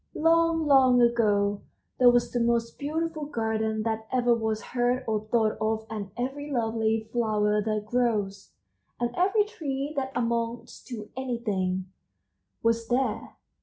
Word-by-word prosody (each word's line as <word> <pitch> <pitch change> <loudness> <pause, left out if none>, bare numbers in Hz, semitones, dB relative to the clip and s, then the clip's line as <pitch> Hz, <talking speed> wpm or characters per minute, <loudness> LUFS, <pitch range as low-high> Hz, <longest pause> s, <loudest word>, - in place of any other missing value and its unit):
"Long, 330 0 +3
long 260 -3 +5
ago 205 -4 +2 0.4
there 250 -1 +8
was 245 0 +2
the 245 - 0
most 235 0 0
beautiful 315 +1 -2
garden 220 -4 -1
that 220 0 -2
ever 245 -2 +3
was 220 -1 -1
heard 245 +1 +1
or 220 -1 +1
thought 220 -1 +1
of 220 0 0
and 205 -3 -5
every 275 +4 -4
lovely 225 -3 0
flower 210 -3 +1
that 215 0 -2
grows, 215 -4 -1 0.5
and 240 0 -1
every 395 +4 +3
tree 290 -7 -4
that 265 -1 -2
amounts 235 0 -2
to 220 -5 -8
anything, 210 -8 -2 0.8
was 230 0 +1
there. 245 -3 -1
235 Hz, 135 wpm, -27 LUFS, 220-260 Hz, 0.8 s, there